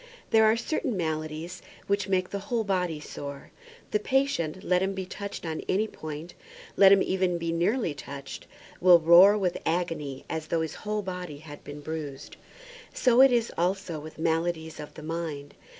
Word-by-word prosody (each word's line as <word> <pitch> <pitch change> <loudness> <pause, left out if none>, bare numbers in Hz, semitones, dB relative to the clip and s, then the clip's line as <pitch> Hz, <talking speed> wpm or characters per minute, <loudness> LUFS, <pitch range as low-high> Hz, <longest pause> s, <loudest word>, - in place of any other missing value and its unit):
There 220 0 +6
are 220 +1 +4
certain 260 - -2
maladies 155 0 -3 0.2
which 200 0 0
make 185 -1 0
the 200 - -2
whole 235 -2 +1
body 180 -6 -1
sore. 140 -1 -8 0.4
The 210 - +2
patient, 205 - 0
let 180 -2 +2
him 195 +1 -1
be 190 -1 -4
touched 200 0 -7
on 160 -1 -3
any 210 +4 +2
point, 155 -2 -8 0.4
let 195 -1 +7
him 195 -1 +6
even 185 -2 0
be 165 0 -2
nearly 175 - +1
touched, 140 -1 -8 0.3
will 180 -1 +8
roar 175 +5 +7
with 185 -4 -1
agony 160 -5 -2
as 160 -1 -4
though 165 +1 0
his 160 - -3
whole 210 0 -3
body 180 -5 -6
had 145 -1 -11
been 145 0 -8
bruised. 150 -3 -6 0.6
So 250 0 +4
it 270 -1 +8
is 235 -1 +1
also 180 -2 -1
with 155 +1 -10
maladies 160 0 -1
of 150 - -9
the 155 - -9
mind. 155 -3 -5
175 Hz, 175 wpm, -27 LUFS, 155-195 Hz, 0.6 s, will